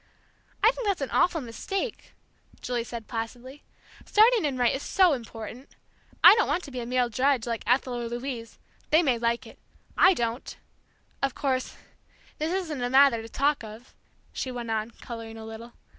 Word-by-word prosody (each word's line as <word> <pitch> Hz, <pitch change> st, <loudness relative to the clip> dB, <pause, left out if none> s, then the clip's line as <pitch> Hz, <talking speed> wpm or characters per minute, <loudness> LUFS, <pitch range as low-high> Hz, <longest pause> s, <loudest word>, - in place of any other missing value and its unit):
"I 450 Hz, -, +7 dB
think -, -, -5 dB
that's 390 Hz, -6 st, 0 dB
an 275 Hz, -, -3 dB
awful 335 Hz, -3 st, +2 dB
mistake," 390 Hz, -, -5 dB, 0.5 s
Julie 245 Hz, -1 st, -2 dB
said 230 Hz, -2 st, -8 dB
placidly. 245 Hz, +4 st, -6 dB, 0.4 s
"Starting 445 Hz, -2 st, +4 dB
in 275 Hz, -3 st, -1 dB
right 245 Hz, -1 st, +3 dB
is 270 Hz, -, -3 dB
so 370 Hz, -1 st, +4 dB
important. 235 Hz, +1 st, -8 dB, 0.5 s
I -, -, +11 dB
don't 445 Hz, 0 st, +2 dB
want 340 Hz, +5 st, 0 dB
to 280 Hz, -, -9 dB
be 255 Hz, -, -5 dB
a 235 Hz, -, -5 dB
mere 250 Hz, 0 st, +1 dB
drudge 255 Hz, +1 st, +1 dB
like 230 Hz, -2 st, -3 dB
Ethel 250 Hz, +1 st, +2 dB
or 240 Hz, -1 st, -3 dB
Louise 240 Hz, -1 st, -5 dB, 0.3 s
they 315 Hz, +3 st, +5 dB
may 255 Hz, -6 st, +1 dB
like 235 Hz, 0 st, 0 dB
it. -, -, -14 dB, 0.4 s
I 375 Hz, -, +6 dB
don't! 235 Hz, -1 st, -3 dB, 0.6 s
Of 275 Hz, -2 st, 0 dB
course, 260 Hz, -3 st, -1 dB, 0.6 s
this 310 Hz, +2 st, -1 dB
isn't 340 Hz, -8 st, -2 dB
a 245 Hz, -, -1 dB
matter 265 Hz, -3 st, +5 dB
to 225 Hz, -, -10 dB
talk 280 Hz, +2 st, +1 dB
of," 220 Hz, +3 st, -11 dB, 0.4 s
she 260 Hz, -, -3 dB
went 240 Hz, -2 st, -5 dB
on, 220 Hz, 0 st, -1 dB
coloring 230 Hz, -1 st, -9 dB
a 220 Hz, -, -9 dB
little. 225 Hz, +2 st, -9 dB
250 Hz, 180 wpm, -27 LUFS, 230-290 Hz, 0.6 s, I